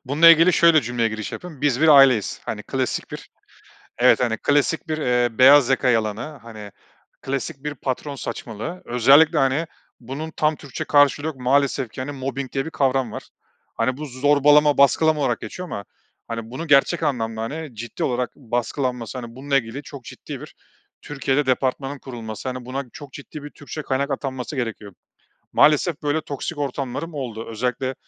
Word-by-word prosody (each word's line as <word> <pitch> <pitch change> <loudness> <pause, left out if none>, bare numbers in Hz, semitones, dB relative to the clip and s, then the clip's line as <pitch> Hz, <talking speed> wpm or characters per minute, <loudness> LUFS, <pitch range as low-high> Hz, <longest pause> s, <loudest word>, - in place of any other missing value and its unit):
Bununla 150 +6 +5
ilgili 165 +2 +6
şöyle 165 -1 +5
cümleye 120 0 0
giriş 110 -1 -6
yapayım. 160 -6 -9
Biz 145 -3 +1
bir 160 - +4
aileyiz, 135 -7 +5
hani, - - -5
klasik - - -3
bir, - - -9 0.7
evet, 125 +1 +5
hani, 115 -3 0
klasik 145 +5 +1
bir, 155 0 -2
eee, 125 -5 0
beyaz 135 0 +7
yaka 130 -1 +2
yalanı, 115 +6 -1
hani, 110 -3 -10 0.5
klasik 135 +2 -4
bir 150 0 -4
patron 135 +2 -4
saçmalığı. 120 - -6
Özellikle, 135 +6 +5
hani, 135 +4 +1 0.3
bunun 140 +6 -6
tam 155 0 0
Türkçe 140 -3 -7
karşılığı 145 +1 +3
yok, 160 - -4
maalesef 135 -1 +1
ki 130 - -6
hani, 145 +3 -4
mobbing 135 -1 -5
diye 135 -1 -1
bir - - -4
kavram 130 -5 0
var. - - -7 0.5
Hani, 130 +3 0
bu 150 - -5
zorbalama, 145 +2 +4
baskılama 150 +2 +4
olarak 135 - 0
geçiyor 180 -1 -7
ama 100 -9 -6 0.4
hani, 115 0 -6
bunu 160 +6 -6
gerçek 145 +4 +3
anlamda, 115 -6 -1
hani, 150 +2 -6
ciddi 115 +2 -6
olarak 125 -1 -1
baskılanması, 125 0 -3
hani, 120 -1 -9
bununla 140 +1 0
ilgili 125 +3 -4
çok 140 -2 -10
ciddi - - -9
bir - - -12 0.5
Türkiye'de 140 0 -1
departmanın 135 +2 -1
kurulması, 115 -2 -7
hani, 125 -1 -6
buna 135 +2 -4
çok 145 -4 -11
ciddi 145 +1 -9
bir 145 - -7
Türkçe 145 +2 -8
kaynak 140 0 -2
atanması 135 0 -4
gerekiyor. 110 -5 -4 0.6
Maalesef 155 +2 +3
böyle 145 +1 0
toksik 145 +2 -6
ortamlarım 140 +3 -4
oldu. 120 -6 -5
Özellikle 125 +3 -2
135 Hz, 170 wpm, -22 LUFS, 125-145 Hz, 0.7 s, beyaz